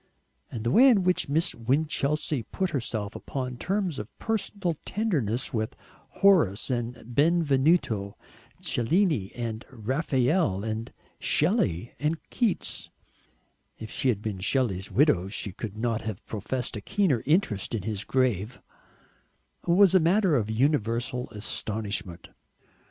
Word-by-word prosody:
And 110 - -6
the 120 - 0
way 260 - +7
in 210 -7 +4
which 180 -5 +1
Miss 160 +4 +2
Winchelsea 145 +3 0
put 190 -2 -1
herself 110 -5 -3
upon 125 -2 -5
terms 190 -1 -1
of 105 - -6
personal 200 -5 -2
tenderness 135 - -1
with 110 -1 -2 0.3
Horace 155 - +3
and 120 -1 -2 0.2
Benvenuto 140 - +2 0.4
Cellini 140 - +1
and 115 -2 -4
Raphael 130 - 0
and 110 +1 -4 0.3
Shelley 135 - +1
and 150 +3 0
Keats 230 -6 0 0.9
if 110 0 -8
she 130 - +1
had 105 -4 0
been 105 -4 -3
Shelley's 100 -3 0
widow 115 - +3
she 100 0 -3
could 105 +1 -7
not 115 0 -1
have 110 -1 -6
professed 115 +4 -3
a 105 - -5
keener 175 - +1
interest 145 - +1
in 105 - -3
his 110 -1 -3
grave 125 -3 0 1.1
was 185 +2 +5
a 190 - +7
matter 180 0 +3
of 110 -5 0
universal 120 0 0
astonishment. 105 -4 -3
125 Hz, 125 wpm, -27 LUFS, 110-165 Hz, 1.1 s, way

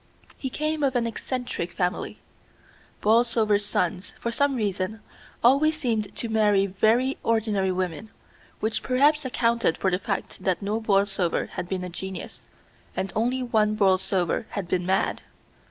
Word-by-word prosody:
He 265 - -4
came 305 +3 -1
of 270 -2 +1
an 240 -1 +2
eccentric 240 -5 -3
family. 180 -1 -2 0.8
Borlsovers' 220 -2 +3
sons, 180 -2 -1
for 235 - -2
some 280 +3 +1
reason, 205 -1 -2 0.4
always 290 +6 +4
seemed 225 -8 -1
to 235 - -3
marry 210 -3 +3
very 220 +7 +2
ordinary 215 -4 +1
women, 185 +3 -3 0.5
which 220 +1 0
perhaps 290 +3 +3
accounted 235 -7 +1
for 190 - +1
the 180 - +1
fact 200 -2 -4
that 185 -3 +1
no 215 +3 -1
Borlsover 195 -4 +1
had 175 - -5
been 185 -1 -2
a 180 - -4
genius, 190 +2 -7 0.5
and 190 -2 -2
only 245 +4 +1
one 215 -3 +2
Borlsover 190 -1 +2
had 200 -4 -4
been 180 0 -1
mad. 190 +1 +1
215 Hz, 145 wpm, -25 LUFS, 190-240 Hz, 0.8 s, always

